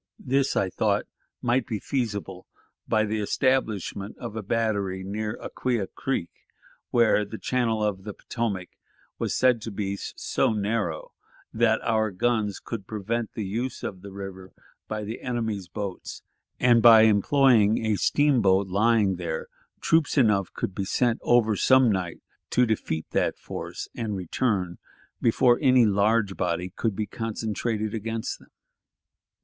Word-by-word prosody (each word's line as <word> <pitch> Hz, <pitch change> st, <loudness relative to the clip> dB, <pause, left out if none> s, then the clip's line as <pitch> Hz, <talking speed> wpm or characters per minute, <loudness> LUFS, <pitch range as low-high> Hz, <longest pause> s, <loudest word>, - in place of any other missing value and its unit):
This, 135 Hz, +1 st, 0 dB
I 95 Hz, -, +1 dB
thought, -, -, +1 dB, 0.4 s
might 120 Hz, 0 st, +1 dB
be 115 Hz, -4 st, -2 dB
feasible 105 Hz, -7 st, -3 dB, 0.4 s
by 110 Hz, 0 st, +2 dB
the 110 Hz, +1 st, -2 dB
establishment 105 Hz, -4 st, -1 dB
of 105 Hz, -, -7 dB
a 110 Hz, -, -3 dB
battery 100 Hz, -3 st, -1 dB
near 105 Hz, +3 st, -3 dB
to -, -, -14 dB
Acquia 120 Hz, -6 st, -1 dB
Creek, 130 Hz, -4 st, -3 dB, 0.6 s
where 115 Hz, -3 st, +3 dB
the 110 Hz, +2 st, -7 dB
channel 115 Hz, -4 st, 0 dB
of 100 Hz, -3 st, -1 dB
the 105 Hz, -1 st, -7 dB
Potomac 100 Hz, -6 st, -3 dB, 0.5 s
was -, -, -1 dB
said 125 Hz, -3 st, +3 dB
to 115 Hz, -, -5 dB
be 100 Hz, -1 st, -3 dB
so 110 Hz, -, -1 dB
narrow 100 Hz, -5 st, -2 dB, 0.4 s
that 110 Hz, 0 st, +2 dB
our 110 Hz, -1 st, +1 dB
guns 105 Hz, +1 st, 0 dB
could 105 Hz, -5 st, -7 dB
prevent 110 Hz, +2 st, -3 dB
the 110 Hz, -, -4 dB
use 120 Hz, +7 st, -3 dB
of 95 Hz, -3 st, -5 dB
the 100 Hz, 0 st, -10 dB
river 95 Hz, -1 st, -8 dB, 0.3 s
by 110 Hz, 0 st, -4 dB
the 110 Hz, +3 st, -6 dB
enemy's 110 Hz, -7 st, -3 dB
boats, 100 Hz, -1 st, -6 dB, 0.4 s
and, 120 Hz, -1 st, +5 dB
by 115 Hz, -2 st, +9 dB
employing 110 Hz, 0 st, +4 dB
a 110 Hz, -1 st, +2 dB
steamboat 100 Hz, -8 st, +3 dB
lying 105 Hz, -1 st, +2 dB
there, 85 Hz, -3 st, -4 dB, 0.3 s
troops 160 Hz, -2 st, +2 dB
enough 105 Hz, -7 st, +3 dB
could 95 Hz, -, -3 dB
be 100 Hz, -, -3 dB
sent 120 Hz, +4 st, +1 dB
over 115 Hz, -3 st, +3 dB
some 130 Hz, +3 st, +5 dB
night 90 Hz, -4 st, -3 dB, 0.3 s
to 125 Hz, -, +3 dB
defeat 90 Hz, -8 st, -2 dB
that -, -, 0 dB
force, -, -, -6 dB
and 110 Hz, -3 st, -3 dB
return 95 Hz, -1 st, -1 dB, 0.4 s
before 120 Hz, +1 st, +4 dB
any 130 Hz, -2 st, +5 dB
large 100 Hz, 0 st, +2 dB
body 90 Hz, +1 st, -2 dB
could 110 Hz, -4 st, -1 dB
be 110 Hz, -, -2 dB
concentrated 110 Hz, 0 st, -3 dB
against 115 Hz, 0 st, -3 dB
them. -, -, -20 dB
110 Hz, 145 wpm, -26 LUFS, 100-115 Hz, 0.6 s, by